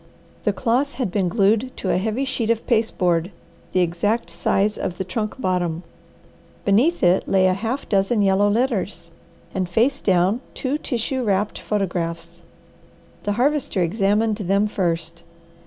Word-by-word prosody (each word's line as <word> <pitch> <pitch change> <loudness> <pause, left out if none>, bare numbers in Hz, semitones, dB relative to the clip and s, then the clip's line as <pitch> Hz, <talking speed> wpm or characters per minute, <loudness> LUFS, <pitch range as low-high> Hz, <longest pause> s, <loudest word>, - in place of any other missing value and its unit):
The - - +3
cloth 260 +5 0
had 240 -7 -2
been 185 -2 +1
glued 215 +6 +2
to - - -1
a - - +2
heavy 220 +7 -1
sheet 250 -4 -2
of 230 -1 0
pasteboard 180 -7 +1 0.4
the 185 - +2
exact 175 +3 0
size 195 +4 +1
of 180 - -4
the - - -2
trunk 215 +5 -4
bottom. 180 -5 -1 0.8
Beneath 240 - +3
it 180 +1 +3
lay 190 -1 +3
half 220 +9 0
a - - -15
dozen 200 +2 +2
yellow 195 +1 +3
letters, 205 -7 -1 0.4
and 185 -2 -2
face 230 +9 +2
down 190 +5 +2
two 280 +3 -2
tissue 255 0 -2
wrapped 205 -1 0
photographs. 170 -4 -3 0.8
The 205 - +1
Harvester 250 -5 +1
examined 210 +4 +1
them 200 0 +1
first. 170 -4 -2
200 Hz, 145 wpm, -22 LUFS, 180-230 Hz, 0.8 s, The